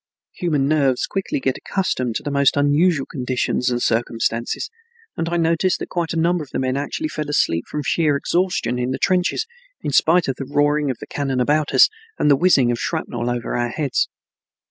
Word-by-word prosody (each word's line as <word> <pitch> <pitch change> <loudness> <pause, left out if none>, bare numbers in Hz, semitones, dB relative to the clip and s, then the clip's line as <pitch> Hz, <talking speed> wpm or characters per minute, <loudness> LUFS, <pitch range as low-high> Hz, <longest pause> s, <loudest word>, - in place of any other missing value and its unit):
Human 150 -6 0
nerves 140 -4 +2
quickly 200 +10 -2
get 265 - -1
accustomed 130 - -2
to - - -3
the 145 - -3
most 140 0 +3
unusual 145 +1 +3
conditions 125 -2 -1
and 120 -1 -1
circumstances 115 - -1 0.4
and 165 - -2
I 175 - 0
noticed 165 +2 +2
that - - -7
quite 170 -2 -2
a 165 - -2
number 170 0 +1
of 140 - -14
men 130 0 0
actually 145 - -2
fell 155 - -5
asleep 85 - +1
from 150 - -4
sheer 150 -1 +2
exhaustion 170 -6 0
in 125 0 -1
the 130 - -2
trenches, 185 - +1 0.4
in - - -2
spite 170 +1 +4
of 135 - -2
the 135 - -5
roaring 145 0 +2
of 130 - -2
the - - -9
cannon 135 -3 -2
about 150 +4 +1
us - - +7 0.3
and 150 - +3
the - - +7
whizzing 135 -6 +4
of 120 - -2
shrapnel 120 0 -2
over 120 -1 -3
our 120 0 0
heads. 140 +1 0
145 Hz, 195 wpm, -21 LUFS, 125-165 Hz, 0.4 s, us